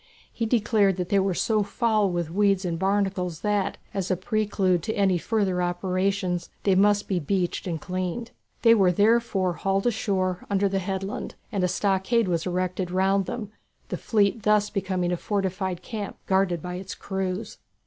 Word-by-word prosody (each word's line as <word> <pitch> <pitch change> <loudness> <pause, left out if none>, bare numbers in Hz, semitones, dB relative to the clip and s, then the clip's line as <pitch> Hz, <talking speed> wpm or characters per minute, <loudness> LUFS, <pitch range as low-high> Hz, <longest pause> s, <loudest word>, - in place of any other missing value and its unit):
He 230 - -1
declared 210 -4 +2
that 180 -1 -3
they 200 -2 +3
were 190 -1 +1
so 215 +2 +2
foul 215 0 +1
with 175 -2 -2
weeds 195 0 +2
and 165 -2 -2
barnacles 190 -3 0
that, 205 -2 0 0.2
as 195 -2 -2
a 185 - +1
prelude 195 -3 +1
to 220 - -2
any 195 -4 +2
further 195 -3 0
operations, 185 +1 -1
they 195 - +3
must 205 +2 +3
be 185 -3 0
beached 180 +4 -1
and 165 -3 -2
cleaned. 185 +6 -4 0.3
They 230 -1 +8
were 195 -5 +4
therefore 205 -2 +2
hauled 195 +2 -1
ashore 190 -5 0
under 200 0 +2
the 195 0 0
headland, 195 +1 -4 0.2
and 200 -4 -1
a - - +4
stockade 195 +4 +1
was 170 -1 -1
erected 185 0 -1
round 190 +1 +2
them, 215 -4 -5 0.4
the - - -2
fleet 215 0 +1
thus 210 0 +2
becoming 185 -3 -1
a 175 - 0
fortified 190 -2 -2
camp 210 -4 -5
guarded 190 -4 +1
by 180 0 -4
its 190 +1 -7
crews. 190 +2 -4
195 Hz, 170 wpm, -25 LUFS, 180-205 Hz, 0.4 s, They